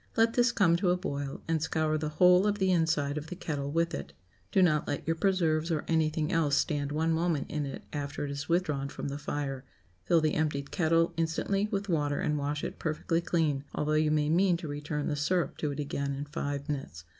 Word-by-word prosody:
Let 225 0 +4
this 240 0 +3
come 170 -7 +3
to 180 0 +1
a 180 - +3
boil, 140 -6 -4
and 160 -1 +1
scour 155 0 0
the 155 0 -1
whole 180 +5 +5
of 205 0 +1
the 190 -2 +2
inside 155 -4 +1
of 150 - -9
the 180 - -6
kettle 145 -5 -3
with 165 +3 0
it. 70 - -5 0.4
Do 190 - +4
not 155 -4 +2
let 145 - -3
your 165 - +1
preserves 165 -3 +1
or 160 -3 -1
anything 160 -1 +1
else 160 -5 +2
stand 145 -1 0
one 160 +2 +1
moment 160 -3 0
in 150 -2 -2
it 135 - -7
after 145 0 -3
it 140 - -4
is 140 +2 -5
withdrawn 150 -6 0
from 140 - -5
the 140 +1 -5
fire; 140 -2 -3 0.4
fill 170 - +4
the 155 -1 +1
emptied 150 -3 -1
kettle 165 -1 +2
instantly 180 +5 0
with 200 -1 -2
water 145 -5 0
and 150 - 0
wash 145 +1 -2
it - - -5
perfectly 165 +1 -1
clean, 155 -5 0
although 150 +1 0
you 155 0 +3
may 150 -1 +2
mean 175 +3 +3
to 170 -2 -7
return 145 0 -3
the 150 - 0
syrup 165 +4 0
to 150 - -1
it 140 0 -5
again 140 -1 -2
in 140 +1 -4
five 145 0 -4
minutes. 135 - -5
155 Hz, 225 wpm, -30 LUFS, 145-170 Hz, 0.4 s, whole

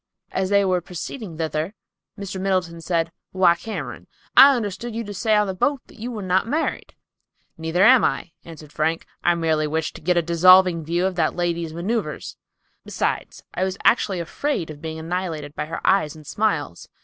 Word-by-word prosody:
As 190 0 -1
they 200 0 +4
were 185 -1 +1
proceeding 180 - -7
thither, 160 +4 -2 0.4
Mr. 195 -2 -5
Middleton 185 -3 -1
said, 165 -1 -1 0.2
"Why, 185 -2 +5
Cameron, 165 - -7 0.3
I 275 0 +9
understood 230 +1 -4
you 230 - -2
to 205 -1 -7
say 220 +2 +1
on 210 0 +3
the 190 - -3
boat 280 +9 +1
that - - -18
you 235 +3 -4
were 220 -4 -5
not 185 +3 +1
married." 305 +7 -2 0.6
"Neither 160 +3 0
am 255 +1 +7
I," - - -1
answered 155 -3 -12
Frank. 160 +2 -1 0.2
"I 175 - +3
merely 160 -2 +1
wished 160 +1 -2
to - - -14
get 175 +2 +1
a 170 - +3
dissolving 175 0 +5
view 170 +4 0
of 190 - 0
that 160 -2 +1
lady's 170 -2 -1
maneuvers. 175 -2 -3 0.5
Besides, - - -3
I 185 - -1
was 190 0 -2
actually 195 -6 +3
afraid 170 - -2
of 150 -1 -11
being 160 -1 -5
annihilated 160 -3 -4
by - - -3
her 165 - -6
eyes 175 -6 +2
and 155 -1 -13
smiles. 165 - -2
175 Hz, 185 wpm, -23 LUFS, 160-200 Hz, 0.6 s, I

